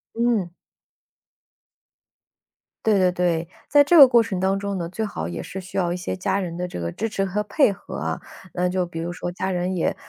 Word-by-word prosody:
嗯。 230 -6 +1 2.3
对 215 -2 +4
对 185 -1 +3
对， 175 -2 0 0.2
在 290 0 +6
这 295 +5 +3
个 285 -5 +11
过 240 -2 +5
程 195 -5 -3
当 190 +1 +1
中 200 0 -3
呢， 170 -1 -4
最 220 +5 -3
好 80 - -4
也 85 -1 -5
是 190 - -7
需 185 - -8
要 175 -2 +1
一 180 - -3
些 180 - -4
家 190 +1 -1
人 175 -3 -4
的 180 0 -2
这 175 - -7
个 85 0 -3
支 225 - -3
持 195 -2 -1
和 200 +2 -1
配 210 +4 +3
合 200 - -9
啊。 - - -3 0.4
那 180 0 +1
就 180 -1 -1
比 165 -1 -7
如 170 +1 -3
说 175 0 -4
家 190 +2 -3
人 180 +1 -1
也 170 - 0
185 Hz, 230 characters per minute, -23 LUFS, 175-205 Hz, 2.3 s, 个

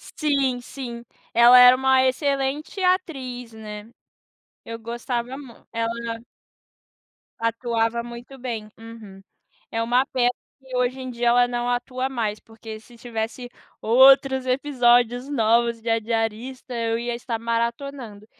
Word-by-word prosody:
Sim, 275 -5 0
sim. 245 -2 -8 0.3
Ela 240 +2 +8
era 250 0 +9
uma 265 0 +4
excelente 275 +5 -1
atriz, 270 -11 -1
né. 210 -1 -9 0.8
Eu 230 0 -6
gostava 240 +2 -4
mu 265 -5 -11 0.2
ela 230 0 -3 1.2
atuava 230 0 0
muito 240 +3 -10
bem. 230 -4 -5
Uhum. 225 -4 -12 0.5
É 225 0 -1
uma 245 +3 +2
pena 245 -2 +1 0.3
que, 265 -1 -9
hoje 250 +1 0
em 255 - -6
dia, 240 0 -1
ela 245 +1 +4
não 240 0 -2
atua 250 +1 -2
mais, 220 -5 -2
porque 220 0 -10
se 235 +2 -18
tivesse 230 +1 -5 0.3
outros 265 +2 +5
episódios 245 -2 +2
novos 235 -2 +2
de 230 - -4
A 225 0 +3
Diarista 225 +3 -3
eu 230 -1 -1
ia 240 0 -3
estar 235 -1 -4
maratonando. 235 -1 -3
240 Hz, 130 wpm, -23 LUFS, 230-260 Hz, 1.2 s, era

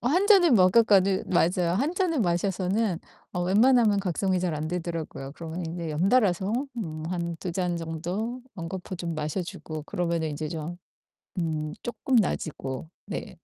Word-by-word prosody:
어 240 - -4
1 360 +9 +3
잔을 360 - +7
먹었거는 195 -1 +5
맞아요. 175 0 +2
1 285 - +1
잔을 350 -7 +1
마셔서는 185 +1 0 0.3
어 180 - -1
웬만하면 215 +2 +4
각성이 185 0 0
잘 175 -3 -1
안 155 +1 -3
되더라고요. 165 -5 -4
그러면 165 +1 -5
인제 165 -1 -4
연달아서 195 +3 +2 0.3
음 155 -6 -4
한 170 -1 -2
2 180 - -3
잔 180 -1 -1
정도 175 +9 -3 0.2
연거푸 180 +2 -5
좀 170 -1 -3
마셔주고 155 0 -4
그러면은 170 -1 -1
인제 155 +1 -4
좀 165 +1 -5 0.6
음 155 -2 -1
쪼끔 245 +2 0
나아지고 155 - -1 0.2
네. - - -6
180 Hz, 305 characters per minute, -27 LUFS, 165-205 Hz, 0.6 s, 잔을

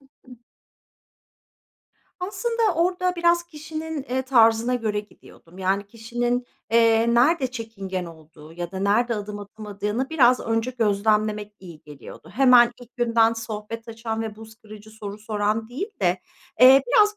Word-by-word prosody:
Hı 275 - -24 0.2
hı. 250 - -11 1.9
Aslında 460 +5 -2
orada 360 +2 0
biraz 345 0 +3
kişinin, 315 -2 -6
eee, 260 -1 -2
tarzına 235 -1 +3
göre 215 -3 -1
gidiyordum. 185 -4 -18
Yani, 195 +2 -1
kişinin, 240 +3 -3 0.2
eee, 230 0 +4
nerede 265 +3 +3
çekingen 195 -6 -5
olduğu 160 -1 -14
ya 175 0 -6
da 190 - -5
nerede 220 +5 +1
adım 210 -1 -6
atamadığını 210 +4 -5
biraz 255 -5 +4
önce 225 +2 -1
gözlemlemek 210 -2 0
iyi 170 -5 -12
geliyordu. 150 +2 -13
Hemen 245 -1 +6
ilk 245 +2 -17
günden 230 -2 +3
sohbet 225 0 -7
açan 225 0 -4
ve 220 -2 -6
buz 220 0 -12
kırıcı 215 -2 -14
soru 210 -2 -8
soran 215 +1 -2
değil 295 - -5
de, 180 +1 +1 0.4
eee, 265 +2 +8
biraz 425 -3 +4
225 Hz, 140 wpm, -23 LUFS, 210-255 Hz, 1.9 s, eee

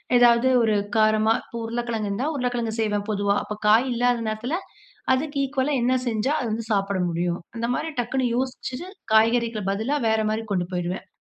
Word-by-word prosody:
எதாவது 240 +1 +5
ஒரு 220 -2 +2 0.2
காரமா 215 0 +4
இப்ப - - -14
உருளைக்கிழங்கு 230 -2 -2
இருந்தா, 245 +9 -1
உருளைக்கிழங்கு 245 -4 -1
செய்வேன். 210 -2 0
பொதுவா 200 -1 +1
அப்ப 210 - -5
காய் 225 +5 +5
இல்லாத 245 0 +1
நேரத்துல 235 +9 -2 0.6
அதுக்கு 285 +2 -1
ஈக்குவலா 275 +1 0
என்ன 250 +2 +3
செஞ்சா 225 +5 0
அது 245 - -2
வந்து 225 +1 -2
சாப்பிட 200 -1 0
முடியும். 175 +1 -1 0.2
அந்த 230 - -1
மாரி 320 - -2
டக்குனு 255 +2 -1
யோசிச்சுட்டு, 260 +5 -4 0.3
காய்கறிக்கு 230 0 +3
பதிலா 220 +9 -1
வேற 220 0 +2
மாரி 220 +1 -2
கொண்டு 180 -2 0
போயிருவேன். 180 +2 -3
230 Hz, 165 wpm, -24 LUFS, 210-250 Hz, 0.6 s, எதாவது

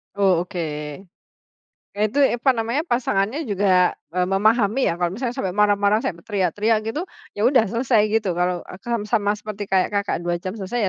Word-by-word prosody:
Oh, 195 -4 +3
oke. 185 -2 -6 1.4
Eee, 210 - +1
itu 255 +7 -3
apa 265 -1 +3
namanya 230 +7 -1
pasangannya 240 - 0
juga, 190 -2 +3 0.2
eee, 180 0 +1
memahami, 215 +5 +2
ya, - - +1
kalau 175 -1 0
misalnya 240 +4 -4
sampai 190 -9 -2
marah-marah, 205 0 +3
sampai 170 -2 -4
teriak-teriak 205 +2 +1
gitu, 225 +8 -2 0.4
ya, - - -4
udah 255 -4 +4
selesai 230 0 +2
gitu, 220 -2 +1
kalau, 180 0 0
eee, 185 - -9
kam 235 -2 -2
sama 205 -3 +1
seperti 210 -1 -6
kayak 190 -1 +2
Kakak 200 -1 0
2 175 0 0
jam 185 +1 -4
selesai, 205 +3 -4
205 Hz, 175 wpm, -22 LUFS, 190-230 Hz, 1.4 s, udah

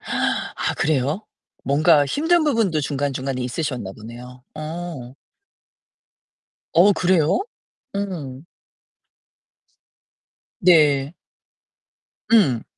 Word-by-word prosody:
아 - - -2
그래요? 150 - 0 0.4
뭔가 150 +2 +4
힘든 325 - +2
부분도 225 - +1
중간중간에 135 -2 -3
있으셨나 125 -6 -4
보네요. 120 +4 -11
어. 155 -4 -7 1.6
어 190 +5 +7
그래요? 175 -5 +2 0.6
음. 165 -9 -5 2.2
네. 150 -4 +4 1.2
응. 140 - +4
150 Hz, 145 characters per minute, -21 LUFS, 130-180 Hz, 2.2 s, 어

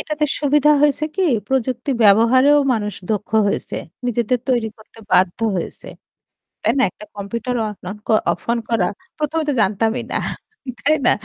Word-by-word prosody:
এটাতে 305 -1 -2
সুবিধা 295 0 +3
হয়েছে 295 +1 +2
কি 385 - +1 0.3
প্রযুক্তি 260 0 -1
ব্যবহারেও 240 +8 +5
মানুষ 210 -4 -2 0.2
দক্ষ 210 -1 -3 0.2
হয়েছে 200 - -2 0.3
নিজেদের 240 +1 0
তৈরি 240 -3 +1
করতে 220 +1 -19
বাধ্য 180 -1 +3 0.2
হয়েছে। 170 - -6 0.7
তাই - - +2
না - - +4
একটা 210 - -13
কম্পিউটার 235 +5 -4
অন 210 - -6 0.6
অফ 170 - -5
অন 235 - +1
করা 220 -6 +2 0.3
১ম 305 +1 -2
এ - - -6
তো - - +1
জানতামই 220 +4 0
না - - 0 0.6
তাই 310 +2 +3
না - - +6
235 Hz, 155 wpm, -20 LUFS, 210-280 Hz, 0.7 s, না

